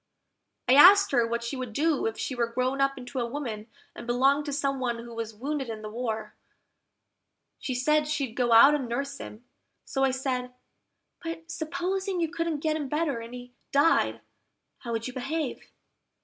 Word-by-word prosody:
I 250 - +5
asked 385 +8 +8
her 240 -4 +3
what 235 0 -2
she 235 +4 -3
would 255 -4 -5
do 305 +1 +1
if 225 - -4
she - - -3
were 240 -2 0
grown 255 +3 -1
up 275 0 +2
into 255 +1 -6
a 240 - 0
woman, 235 -5 -5 0.3
and - - -9
belonged 270 +4 +3
to - - -2
some 275 -1 -1
one 240 -2 -1
who 235 0 -9
was 225 -1 -5
wounded 270 +2 -3
in 215 -1 -6
the 215 - -6
war, 220 -2 -4 1.3
She 255 - -3
said 300 +4 +2
she'd 285 -6 -2
go 240 -1 0
out 230 +6 +8
and 270 -5 -1
nurse 275 +4 -3
him: 220 +4 -10 0.4
so 270 -1 -1
I 270 - +4
said, 255 -1 -3 0.7
"But 330 0 -6
supposing 365 +4 -2
you 330 -2 0
couldn't 330 -4 -2
get 310 0 0
him 300 -3 -3
better, 300 -4 0
and 230 +2 -8
he 245 0 -10 0.2
died; 285 +4 +3 0.6
how 235 - -6
would 230 0 -2
you 255 - -7
behave?" 275 +3 -4
265 Hz, 190 wpm, -27 LUFS, 235-295 Hz, 1.3 s, asked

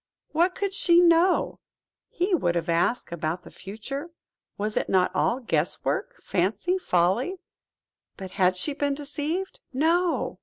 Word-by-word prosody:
What 345 +4 +2
could 400 -1 -2
she 345 -3 +4
know, 350 +1 +3 0.5
he 365 +3 -1
would 175 - +1
have 170 -1 -2
asked, 170 +6 +1
about 170 +1 -3
the - - -13
future? 250 - -7 0.5
Was 210 +1 -2
it - - -1
not 185 -1 +3
all 245 - +1
guess 245 - -1
work, - - -2
fancy, 210 - 0
folly? 190 - +1 0.8
But 190 -1 -8
had 185 -2 +2
she 290 +10 0
been 285 -1 -1
deceived! 300 +6 -4
No! 330 +6 +1
275 Hz, 145 wpm, -26 LUFS, -, 0.8 s, she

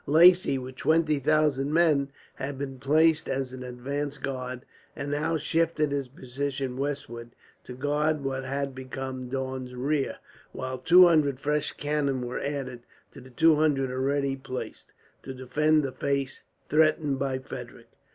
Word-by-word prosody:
Lacy, 170 -1 +6
with 130 0 -7
twenty 155 -2 +2
thousand 145 -1 +2
men, 155 -4 +3 0.2
had 135 +1 -5
been 135 -1 -5
placed 155 +3 +3
as 135 -1 -2
an 130 - -7
advanced 135 +3 -4
guard; 130 -1 -4 0.3
and 145 - -4
now 155 +3 0
shifted 155 -1 0
his 140 -2 -1
position 130 0 -4
westward, 130 -4 -4 0.4
to 125 - -8
guard 145 +3 0
what 135 -1 -2
had 140 +1 -3
become 130 -1 -6
Daun's 130 -1 -4
rear; 140 +2 -1 0.4
while 130 0 -4
two 180 +2 +8
hundred 150 -6 +3
fresh 150 +1 -1
cannon 140 -4 -1
were 120 - -4
added, 135 -4 -4 0.3
to - - -12
the 130 - -14
two 160 +4 +4
hundred 140 -4 +2
already 135 +1 0
placed, 130 -1 -7 0.3
to 130 - -7
defend 150 +4 +2
the 135 - -2
face 135 +1 -2 0.3
threatened 150 -3 +2
by 135 -1 -1
Frederick. 130 - -9
140 Hz, 150 wpm, -27 LUFS, 130-150 Hz, 0.4 s, two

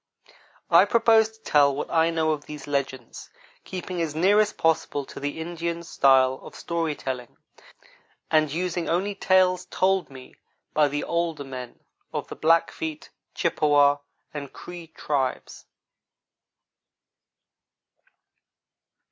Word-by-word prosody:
I - - +7
propose 225 -2 +4
to 220 0 -24
tell 140 -2 +4
what 145 - -4
I 165 0 +3
know 160 -1 +1
of 150 -2 -4
these 150 -2 -8
legends, 135 -4 -4 0.3
keeping 185 -1 -5
as 155 -2 -2
near 190 +6 +4
as 210 -1 +3
possible 160 -5 0
to - - -10
the 145 +2 -4
Indian's 170 0 -4
style 130 -1 +4
of - - -12
story 165 -3 -2
telling, 125 -4 -6 0.9
and 155 -2 +3
using 175 +1 -2
only 190 +5 0
tales 185 -2 +2
told 190 +1 +1
me 130 -2 -13 0.4
by 150 -1 +4
the 145 +1 -3
older 170 -3 -2
men 130 -3 -9 0.3
of - - -4
the - - -7
Blackfeet, 160 -1 0 0.2
Chippewa, 145 -1 +3 0.4
and 145 -2 -6
Cree 175 -2 -10
tribes. 140 -4 -3
160 Hz, 120 wpm, -25 LUFS, 145-175 Hz, 0.9 s, I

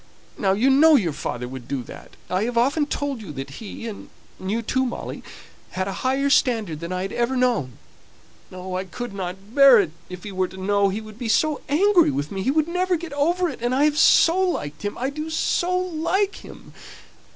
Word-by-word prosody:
Now 190 -1 +1
you 245 +7 +3
know 310 +3 +6
your 180 - +1
father 125 -4 -4
would 125 -1 -9
do 135 -3 -3
that. - - -12
I 185 +4 0
have 240 0 -3
often 285 +5 +2
told 285 -5 -3
you 190 -8 -8
that 135 0 -6
he 225 +2 -7
(and 210 -3 -8 0.3
you 215 +5 -2
too, 260 +4 0
Molly,) 245 - -5 0.5
had 185 +1 -2
a 195 - -3
higher 270 +2 +1
standard 220 - +2
than 170 +2 -6
I 185 0 -2
had 195 - -5
ever 240 +2 0
known. 235 - 0 0.7
Oh, 185 0 -7
I 185 +1 -2
couldn't 195 -1 -7
bear 275 -4 +8
it; 180 -7 0 0.2
if 180 -1 -9
he 210 - -6
were 185 -1 0
to 190 - -13
know 200 +1 +2
he 205 +3 -3
would 215 0 -12
be 240 -3 -3
so 305 +5 +2
angry 360 +4 +4
with 140 +2 -3
me 195 -1 -3
he 210 - 0
would 310 +2 +2
never 360 +1 0
get 335 -3 -6
over 345 +6 +1
it, 290 - -6
and 240 +2 0
I 280 - +3
have 300 0 +2
so 335 +2 +5
liked 150 - -2
him! 205 0 -4
I 260 +3 -2
do 305 +2 -5
so 350 +3 0
like 365 +3 -1
him!" - - -13
235 Hz, 215 wpm, -23 LUFS, 190-295 Hz, 0.7 s, bear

